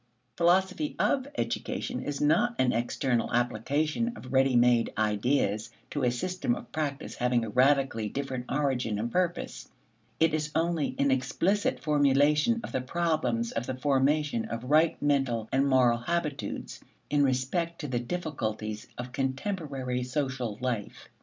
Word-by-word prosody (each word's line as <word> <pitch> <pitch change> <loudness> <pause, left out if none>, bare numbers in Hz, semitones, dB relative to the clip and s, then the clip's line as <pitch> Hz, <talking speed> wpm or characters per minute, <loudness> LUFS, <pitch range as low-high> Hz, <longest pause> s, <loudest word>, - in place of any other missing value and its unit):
"Philosophy 190 - +2
of 270 -1 +1
education" - - -2
is 145 -1 -4
not 235 +11 +3
an 125 -1 +2
external 120 +1 0
application 145 - 0
of 130 - -9
ready 135 -1 +4
made 120 -1 +4
ideas 110 0 +1 0.2
to 145 - -2
a 125 - +4
system 125 +1 -1
of - - -10
practice 150 -2 -3
having 125 -1 +1
a - - -5
radically 130 -3 +2
different 130 0 -4
origin 130 -6 0
and 115 +3 -2
purpose: 180 -1 -2 0.5
it 160 -1 +3
is 155 -1 -1
only 165 -2 0
an 140 0 +2
explicit 150 +10 0
formulation 150 - +3
of - - -6
the 130 - -1
problems 130 -6 0
of 115 +2 -3
the 130 - -2
formation 140 -2 +1
of 115 +1 -5
right 155 +2 +4
mental 135 -6 +1
and 135 +1 +2
moral 125 -3 +4
habitudes 150 +2 -3 0.3
in 145 -1 +4
respect 140 +6 0
to 150 - -4
the 125 -3 -1
difficulties 115 -8 -4
of 125 +1 -6
contemporary 135 -2 -2
social 125 -4 -2
life. 120 -5 -4
135 Hz, 145 wpm, -28 LUFS, 120-155 Hz, 0.5 s, ready